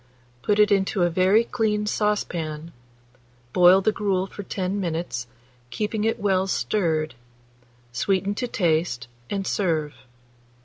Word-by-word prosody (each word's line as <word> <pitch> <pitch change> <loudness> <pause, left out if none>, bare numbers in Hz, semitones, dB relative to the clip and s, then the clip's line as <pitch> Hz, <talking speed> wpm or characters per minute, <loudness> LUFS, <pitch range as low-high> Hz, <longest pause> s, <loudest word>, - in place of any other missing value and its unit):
Put 210 - +1
it 210 0 +5
into 195 -1 +2
a 175 - +2
very 185 +6 +4
clean 215 -3 -1
saucepan; 170 -7 -2 0.8
boil 180 +1 +6
the 215 - +2
gruel 195 -3 0
for 195 - -8
10 190 0 -3
minutes, 165 -8 -3 0.4
keeping 210 - -2
it 225 +1 0
well 190 -2 +1
stirred; 160 -6 0 0.8
sweeten 195 +10 0
to 245 +4 -3
taste, 160 - 0 0.2
and 195 -1 -2
serve. 160 -8 0
190 Hz, 125 wpm, -24 LUFS, 170-210 Hz, 0.8 s, boil